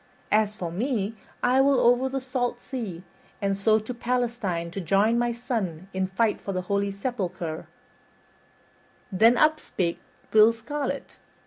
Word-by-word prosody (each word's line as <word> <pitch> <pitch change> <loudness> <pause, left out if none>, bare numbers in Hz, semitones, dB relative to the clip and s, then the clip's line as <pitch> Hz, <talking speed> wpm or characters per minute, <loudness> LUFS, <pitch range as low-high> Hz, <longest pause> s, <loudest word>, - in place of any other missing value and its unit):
As 215 0 +3
for 175 -5 -4
me, 215 +1 -1 0.3
I 255 +2 +4
will 275 -1 +4
over 245 +2 +4
the 270 +1 -2
salt 250 -2 -2
sea, 215 -11 -6 0.4
and 195 -1 0
so 215 +2 +3
to 220 +3 -4
Palestine 235 -8 -1
to 195 - -4
join 200 +7 +3
my 240 0 +1
son 220 - -3
in 190 0 0
fight 210 +3 0
for 195 - -4
the 185 0 -2
holy 200 +2 0
sepulcher." 195 -7 -4 1.4
Then 225 +6 +5
up 305 +2 +4
spake 170 - -2 0.3
Will 220 +1 +7
Scarlet. 275 +4 -5
220 Hz, 145 wpm, -26 LUFS, 195-245 Hz, 1.4 s, Will